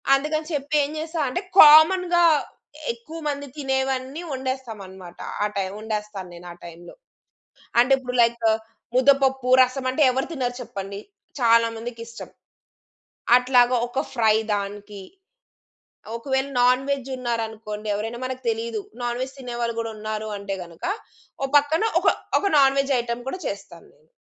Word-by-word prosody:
అందుకని 305 +3 -2
చెప్పి 290 +1 -2
ఏం 285 - -3
చేస్తా 320 +1 -4
అంటే 310 +9 -2 0.2
కామన్‌గా 345 +3 +7 0.7
ఎక్కువ 460 -9 -10
మంది 285 -1 -3
తినేవన్నీ 265 +1 -2
వండేస్తాం 260 -4 -4
అన్నమాట. 185 -2 -12 0.3
ఆ - - +2
టైమ్ 195 -1 -2
వండేస్తాను 210 -3 -5
నేను 175 +1 -11
ఆ - - -9
టైమ్‌లో. 170 +1 -11 0.9
అంటే 250 +3 +3
ఇప్పుడు 250 -1 -6
లైక్, 235 0 +1 0.5
ముద్దపప్పు 265 -1 +3
రసం 255 +1 -1
అంటే 260 +4 +1
ఎవరు 265 +2 -1
తినరు 250 -5 -2
చెప్పండి. 200 -3 -7 0.4
చాలా 230 -1 +5
మందికిష్టం. 230 0 -8 1.1
అట్లాగా 250 0 +4
ఒక 265 +3 -2
ఫ్రై 220 -4 +3 0.2
దానికి, 205 0 -5 1.2
ఒకవేళ 265 +2 -1
నాన్‌వెజ్ 265 +2 +1
ఉన్నారనుకోండి 225 -3 -4
ఎవరైనా 225 +4 -4
మనకు 255 0 -6
తెలీదు. 225 -1 -3 0.2
నాన్‌వెజ్ 250 +3 -3
తినేవాళ్ళు 240 -2 -3
కూడా 225 -1 -4
ఉన్నారు 215 0 -4
అంటే 200 -1 -4
గనుక 170 -1 -13 0.6
ఓ - - +2
పక్కన 305 +7 0 0.2
ఒక - - +2 0.3
ఒక - - -1
నాన్‌వెజ్ 275 0 +3
ఐటెమ్ 235 0 -4
కూడా 370 +7 -5
చేస్తాను 195 -4 -8
నేను. 155 +2 -30
245 Hz, 130 wpm, -23 LUFS, 215-270 Hz, 1.2 s, కామన్‌గా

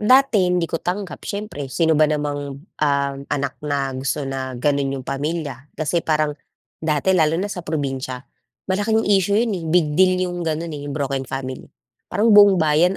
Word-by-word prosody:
Dati 220 -4 +4
hindi 180 -1 +1
ko 165 0 -3
tanggap, 185 +1 -4
siyempre. 200 -10 -5
Sino 160 +4 +2
ba 155 0 +4
namang, 145 -2 -2 0.2
ah, 140 -2 +2 0.2
anak 140 -1 -2
na 140 -2 -1
gusto 135 +2 -2
na 130 -1 -4
gano'n 140 +1 0
'yong 130 - -7
pamilya. 145 -1 -4
Kasi 160 +2 0
parang, 155 -2 +1 0.5
dati 160 +4 +1
lalo 160 -3 +3
na 200 +3 -2
sa 180 - -5
probinsiya, 135 -5 -3 0.5
malaking 210 +4 +1
issue 200 0 +3
'yon, 225 0 +2
eh. 175 -4 -4
Big 160 -3 +3
deal 185 -1 +5
'yong 175 -1 -4
gano'n, 165 0 -2
eh, 145 -1 -6
'yong 140 - -4
broken 135 -2 -1
family. 130 -1 -5 0.4
Parang 215 +4 +3
buong 205 -2 +8
bayan 160 +3 +3
155 Hz, 175 wpm, -21 LUFS, 140-185 Hz, 0.5 s, buong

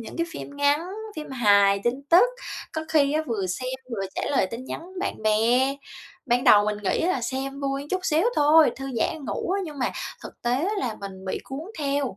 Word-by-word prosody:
những 230 - -9
cái 335 0 0
phim 285 -3 -8
ngắn, 285 +1 +3 0.4
phim 300 -2 -6
hài, 200 -5 +4
tin 255 +3 0
tức, 350 +7 +8 0.5
có 315 - -2
khi 295 -3 +3
á 310 - +1
vừa 205 -5 -1
xem 255 +8 -3 0.2
vừa 195 -4 -2
trả - - -3
lời 265 -9 +2
tin 235 +3 -6
nhắn - - -5 0.2
bạn 385 - -3
bè. 235 +5 +3 0.5
Ban 245 +1 +2
đầu 205 0 +7
mình 210 0 -1
nghĩ 185 - +1
là 330 -7 +1
xem 270 +3 -3
vui 275 0 -2
chút 375 - 0
xíu 320 +2 +2
thôi, 300 -1 +6
thư 270 - -6
giãn 285 +5 -1
ngủ - - -3
á, 390 +1 +1
nhưng 300 -4 -8
mà 255 - 0 0.3
thực - - -11
tế 240 - +1
á 345 +10 0
là 235 - -2
mình 190 -1 -8
bị 190 - -2
cuốn 270 +2 -6 0.2
theo. 280 -6 -1
270 Hz, 215 wpm, -25 LUFS, 220-295 Hz, 0.5 s, tức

